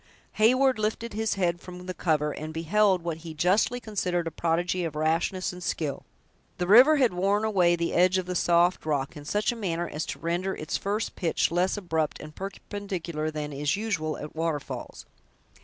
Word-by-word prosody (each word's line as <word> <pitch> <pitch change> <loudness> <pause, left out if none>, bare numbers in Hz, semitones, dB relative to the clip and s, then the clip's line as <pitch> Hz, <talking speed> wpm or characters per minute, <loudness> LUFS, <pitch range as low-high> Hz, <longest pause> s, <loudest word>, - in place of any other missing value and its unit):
Heyward 255 +2 +4
lifted 220 +2 -2
his 220 0 0
head 175 -2 0
from 180 0 -10
the 185 - -4
cover, 150 -4 0
and 155 +2 -6
beheld 185 +2 +2
what 170 -2 -3
he 165 -1 -9
justly 190 +9 +2
considered 180 -6 -2
a 165 - -3
prodigy 175 +3 0
of 160 -3 -3
rashness 165 +5 0
and 180 - -9
skill. 150 -5 -3 0.5
The 180 - -1
river 250 - +8
had 255 -8 +3
worn 200 +4 +1
away 180 -5 +3
the 170 0 -2
edge 185 +2 +4
of 185 - -1
the 180 - -3
soft 175 +1 +3
rock 145 +1 -1
in 145 -1 -9
such 210 +8 +1
a - - -5
manner 175 -6 -2
as 150 +2 -4
to - - -4
render 175 +3 -2
its 155 - -4
first 205 +2 -2
pitch 170 -3 0
less 180 +4 +1
abrupt 160 -6 -1
and 155 0 -10
perpendicular 190 -5 -4
than 150 -1 -5
is 145 +4 0
usual 190 -8 -2
at 150 - -8
waterfalls. 160 -3 -4
175 Hz, 190 wpm, -27 LUFS, 160-200 Hz, 0.5 s, river